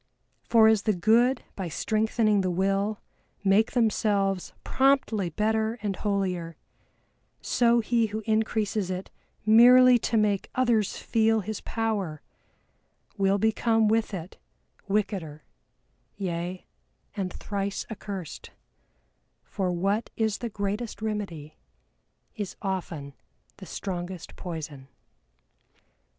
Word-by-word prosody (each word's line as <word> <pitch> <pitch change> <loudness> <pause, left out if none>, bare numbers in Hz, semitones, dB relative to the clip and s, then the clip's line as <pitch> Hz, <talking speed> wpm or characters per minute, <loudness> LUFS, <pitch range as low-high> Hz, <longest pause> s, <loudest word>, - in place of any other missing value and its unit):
For 225 -2 +5
as 220 -2 +4
the 215 0 +1
good 230 +7 +3
by 190 -3 -4
strengthening 215 +2 +1
the 185 - 0
Will 195 +3 0 0.4
make 205 +3 +3
themselves 205 -5 +1
promptly 260 -8 +2
better 220 +5 0
and 200 -2 -1
holier, 185 -6 -2 0.8
so 235 -1 +3
he 230 0 +1
who 215 +1 -5
increases 215 -3 0
it 185 +1 -5 0.3
merely 245 +3 +7
to 230 - 0
make 205 -2 +1
others 235 -5 +1
feel 225 -1 +2
his 215 +1 -5
power 205 -9 -2 0.9
will 195 -1 +2
become 220 +1 +2
with 225 +1 +1
it 180 -2 -7 0.5
wickeder, 190 -7 -2 0.7
yea, 180 -1 -4 0.5
and 190 -3 -2
thrice 200 -1 -4
accursed, 195 -6 -7 0.9
for 190 -3 -2
what 195 +6 0
is 220 -2 0
the 240 - -4
greatest 205 +1 -4
remedy 185 -9 -4 0.8
is 205 -4 -5
often 170 -7 -4 0.4
the 190 - -11
strongest 180 -1 -6
poison. 155 -6 -7
205 Hz, 105 wpm, -27 LUFS, 185-220 Hz, 0.9 s, merely